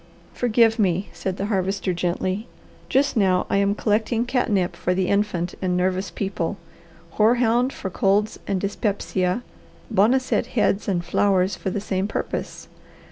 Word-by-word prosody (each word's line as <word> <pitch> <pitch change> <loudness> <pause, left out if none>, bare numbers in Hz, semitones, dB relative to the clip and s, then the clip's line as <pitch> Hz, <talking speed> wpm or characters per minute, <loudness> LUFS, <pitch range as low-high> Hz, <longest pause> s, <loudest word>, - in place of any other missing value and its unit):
"Forgive 230 -1 +3
me," 190 -1 +1
said 190 -1 -4
the 195 - -2
Harvester 195 -2 -1
gently. 185 +5 -2 0.4
"Just 275 +1 +2
now 190 -4 +3
I - - +3
am 200 0 +2
collecting 220 +2 0
catnip 205 -8 0
for 180 +1 -1
the 185 -1 0
infant 200 -4 0
and 180 -1 0
nervous 185 +1 0
people, 195 -2 -3 0.6
hoarhound 240 +3 +3
for 190 - -6
colds 205 +4 +1
and 195 - 0
dyspepsia, 200 0 -1 0.5
boneset 235 +4 +2
heads 205 -2 +2
and 175 -3 0
flowers 190 +1 +2
for 190 - -4
the 205 - -2
same 195 -1 -2
purpose. - - -4
200 Hz, 140 wpm, -23 LUFS, 185-220 Hz, 0.6 s, Forgive